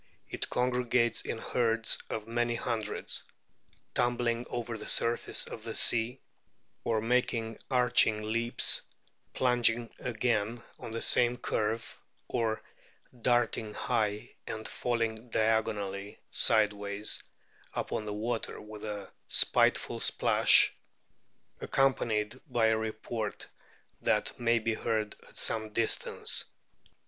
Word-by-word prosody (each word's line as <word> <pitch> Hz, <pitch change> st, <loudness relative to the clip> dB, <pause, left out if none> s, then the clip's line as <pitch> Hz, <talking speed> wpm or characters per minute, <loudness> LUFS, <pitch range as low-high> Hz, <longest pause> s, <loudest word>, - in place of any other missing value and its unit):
It -, -, -3 dB
congregates 125 Hz, -2 st, +1 dB
in -, -, -4 dB
herds 115 Hz, -1 st, +2 dB
of 110 Hz, -, -4 dB
many 120 Hz, 0 st, 0 dB
hundreds, 115 Hz, -3 st, -2 dB, 0.7 s
"tumbling 120 Hz, -1 st, 0 dB
over 120 Hz, -1 st, -4 dB
the 110 Hz, -, -6 dB
surface 120 Hz, 0 st, +3 dB
of -, -, -8 dB
the -, -, -5 dB
sea, 120 Hz, +3 st, +2 dB, 0.6 s
or 110 Hz, -2 st, 0 dB
making 115 Hz, -1 st, 0 dB
arching 125 Hz, -4 st, +3 dB
leaps, 115 Hz, +2 st, 0 dB, 0.5 s
plunging 120 Hz, -2 st, +2 dB
again 115 Hz, -1 st, -1 dB, 0.2 s
on -, -, -7 dB
the 115 Hz, +1 st, -3 dB
same 120 Hz, 0 st, +3 dB
curve, 110 Hz, -1 st, -2 dB, 0.3 s
or 115 Hz, -3 st, -1 dB, 0.6 s
darting 115 Hz, -3 st, +1 dB
high 105 Hz, -3 st, -1 dB
and 110 Hz, -1 st, -5 dB
falling 115 Hz, -1 st, -2 dB
diagonally 105 Hz, -3 st, 0 dB
sideways 105 Hz, -1 st, +2 dB, 0.5 s
upon 105 Hz, -, -2 dB
the 105 Hz, -, -3 dB
water 115 Hz, +2 st, -3 dB
with 105 Hz, 0 st, -10 dB
a 105 Hz, -2 st, -6 dB, 0.2 s
spiteful -, -, +3 dB
splash, -, -, +4 dB, 0.9 s
accompanied 120 Hz, -4 st, 0 dB
by 120 Hz, -4 st, +2 dB
a 110 Hz, -, +3 dB
report 110 Hz, 0 st, -4 dB, 0.6 s
that -, -, 0 dB
may 120 Hz, 0 st, +3 dB
be 115 Hz, 0 st, 0 dB
heard 110 Hz, -1 st, -2 dB
at -, -, -14 dB
some 110 Hz, -1 st, 0 dB
distance. 115 Hz, 0 st, +2 dB
115 Hz, 110 wpm, -30 LUFS, 110-120 Hz, 0.9 s, splash